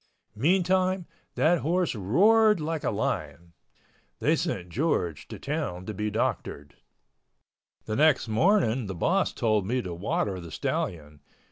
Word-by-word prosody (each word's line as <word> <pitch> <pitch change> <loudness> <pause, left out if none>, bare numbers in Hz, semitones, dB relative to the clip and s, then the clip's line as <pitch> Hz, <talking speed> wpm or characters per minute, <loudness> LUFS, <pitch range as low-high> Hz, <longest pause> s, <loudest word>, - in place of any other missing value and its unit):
Meantime 185 - +2 0.3
that 170 +2 +3
horse 175 +4 0
roared 210 - +4
like 160 0 -3
a - - +1
lion. 85 0 -3 0.6
They - - +2
sent 90 0 -3
George 90 - -1
to - - -8
town 140 - -4
to 110 - -5
be 105 +2 -2
doctored. 75 -8 -3 1.1
The 110 - -3
next 150 -1 +3
morning 125 - +2
the 95 - -5
boss 185 - +1
told 110 -5 0
me 125 +4 0
to 90 -2 -5
water 95 +2 -2
the 85 -1 -9
stallion. 75 -2 -3
120 Hz, 135 wpm, -27 LUFS, -, 1.1 s, roared